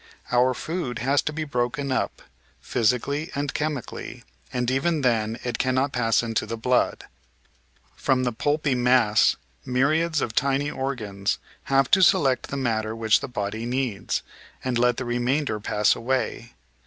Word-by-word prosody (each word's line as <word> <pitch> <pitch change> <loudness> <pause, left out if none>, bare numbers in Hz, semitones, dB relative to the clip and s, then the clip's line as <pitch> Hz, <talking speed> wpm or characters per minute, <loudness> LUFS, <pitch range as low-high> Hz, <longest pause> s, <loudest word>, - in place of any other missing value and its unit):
Our 125 +1 +3
food 155 -7 -3
has 135 +4 +2
to - - -2
be 155 +1 -3
broken 135 0 -2
up, - - -2 0.4
physically 125 - 0
and 140 0 -2
chemically, 150 -5 -4 0.3
and 125 0 -1
even 150 +4 +1
then 115 -3 +1
it 120 -2 -3
cannot 130 +2 +1
pass 115 -1 +2
into 115 -1 -1
the 115 - -4
blood. 125 +2 +1 0.9
From 130 -1 +1
the 125 - +1
pulpy 145 +4 0
mass 125 -3 +4 0.3
myriads 155 +5 +1
of 115 - -2
tiny 140 +3 +1
organs 110 -8 -2 0.3
have 135 -2 +2
to 190 - +6
select 135 -7 +4
the 140 - -3
matter 110 -4 -1
which 110 -1 +3
the - - -5
body 110 0 -4
needs, 125 -5 -2 0.4
and 125 -2 0
let 125 0 +3
the 130 - -3
remainder 120 0 0
pass 105 0 +2
away. 120 -1 -2
125 Hz, 150 wpm, -25 LUFS, 115-140 Hz, 0.9 s, to